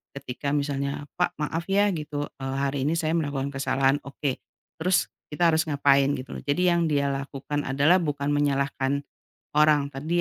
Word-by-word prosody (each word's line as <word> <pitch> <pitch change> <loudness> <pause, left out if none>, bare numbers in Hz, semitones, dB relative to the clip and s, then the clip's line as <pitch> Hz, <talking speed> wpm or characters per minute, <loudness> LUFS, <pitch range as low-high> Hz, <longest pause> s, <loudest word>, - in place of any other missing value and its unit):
ketika 140 +1 -4
misalnya, 140 -1 -2 0.2
"Pak, 180 - +1
maaf 165 +3 -2
ya,", 200 +1 +4
gitu, 150 -2 -3 0.2
eee, 135 0 -3
"hari 140 0 -1
ini 155 - +2
saya 155 -1 0
melakukan 140 -3 -2
kesalahan". 135 0 +2
"Oke, 140 -1 -3 0.4
terus 180 +3 +2 0.2
kita 165 +3 +3
harus 160 0 +3
ngapain?", 140 -1 +4
gitu 130 +1 -7
loh. - - -13
Jadi 145 +5 0
yang 170 -1 +2
dia 140 -1 +2
lakukan 140 +1 -4
adalah 140 +6 +4
bukan 145 -2 -2
menyalahkan 140 -1 0 0.5
orang, 150 -2 +5
tapi 135 +3 -7
145 Hz, 165 wpm, -26 LUFS, 140-150 Hz, 0.5 s, orang